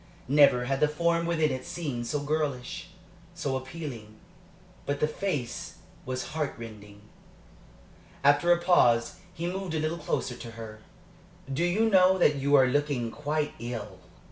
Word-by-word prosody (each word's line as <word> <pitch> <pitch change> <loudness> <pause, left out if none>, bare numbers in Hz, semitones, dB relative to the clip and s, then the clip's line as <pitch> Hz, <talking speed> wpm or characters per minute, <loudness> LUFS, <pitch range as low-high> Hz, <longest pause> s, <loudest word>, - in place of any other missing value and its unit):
Never 140 -3 +5
had 135 +1 -1
the 150 - +4
form 170 +2 +1
within 160 -3 +2
it 130 0 -4
seemed 130 -9 -4
so 145 +3 -1
girlish, 145 -2 -2 0.5
so 145 -6 -2
appealing. 130 -5 -7 0.7
But 145 0 -1
the 150 - +2
face 150 -7 -3 0.3
was 130 0 -3
heart 155 -2 -2
rending. 105 -3 -10 1.2
After 145 +5 +5
a 175 - +6
pause 125 -10 +3 0.2
he 170 -1 -4
moved 180 -1 -3
a - - 0
little 155 +2 -2
closer 140 -4 -2
to 115 - -9
her. 110 -1 -9 0.7
"Do 150 +6 0
you 195 +6 +2
know 190 -2 +5
that 150 -5 +4
you 140 +1 +3
are 135 -2 +7
looking 130 -3 0
quite 150 +2 -2
ill?" 110 -5 -6
145 Hz, 150 wpm, -28 LUFS, 125-165 Hz, 1.2 s, are